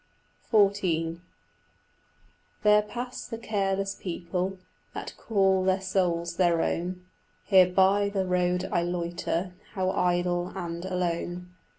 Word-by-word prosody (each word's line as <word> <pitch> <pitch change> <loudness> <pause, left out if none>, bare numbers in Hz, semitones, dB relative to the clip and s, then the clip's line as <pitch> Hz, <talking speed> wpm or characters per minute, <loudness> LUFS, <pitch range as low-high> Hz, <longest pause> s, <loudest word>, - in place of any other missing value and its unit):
XIV 185 -6 +2 1.4
There 210 0 +6
pass 245 +4 -6
the 230 - -5
careless 195 -3 -1
people 180 +1 -3 0.4
That - - -5
call 195 -3 +2
their 190 0 +2
souls 180 -3 -1
their 170 -3 +3
own: 180 +1 -2 0.4
Here 190 -3 +6
by 195 +2 +4
the 195 -2 -1
road 180 0 +1
I 175 - +2
loiter, 175 +1 -2 0.2
How 185 -1 +1
idle 175 0 0
and 170 -2 -4
alone. 180 0 -3
185 Hz, 110 wpm, -27 LUFS, 175-195 Hz, 1.4 s, There